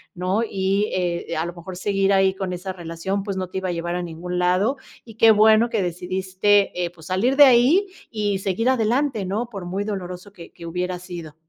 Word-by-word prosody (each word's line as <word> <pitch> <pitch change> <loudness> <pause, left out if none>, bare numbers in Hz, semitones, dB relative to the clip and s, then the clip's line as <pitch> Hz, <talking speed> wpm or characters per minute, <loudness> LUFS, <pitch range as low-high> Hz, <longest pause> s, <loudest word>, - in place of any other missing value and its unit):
¿no? 185 +4 0
Y, 200 -1 0
eh, 175 -2 -2
a 160 - -1
lo 175 - -5
mejor, 180 +1 -9
seguir 195 +1 +1
ahí 190 0 +3
con 190 -1 -4
esa 180 +1 -5
relación, 175 +3 -4
pues, 195 -1 -4
no 185 - -3
te 190 - -2
iba 190 -1 -3
a - - 0
llevar 170 0 -3
a 180 - -2
ningún 175 +1 -5
lado, 185 +9 +2 0.3
y 225 -3 -13
qué 225 - +6
bueno 220 +2 +5
que 200 - 0
decidiste, 185 +2 0
eh, 175 - -1
pues 170 -2 -16
salir 205 +9 +1
de 290 - +8
ahí 270 +9 +5 0.2
y 205 -3 -1
seguir 195 +5 0
adelante 245 -1 +1
¿no?, 210 +6 -2
por 195 -5 -7
muy 190 +3 -3
doloroso 190 -2 -6
que 170 -4 -13
que 170 - -11
hubiera 180 +2 -3
sido. 170 -4 -9
190 Hz, 215 wpm, -22 LUFS, 180-210 Hz, 0.3 s, de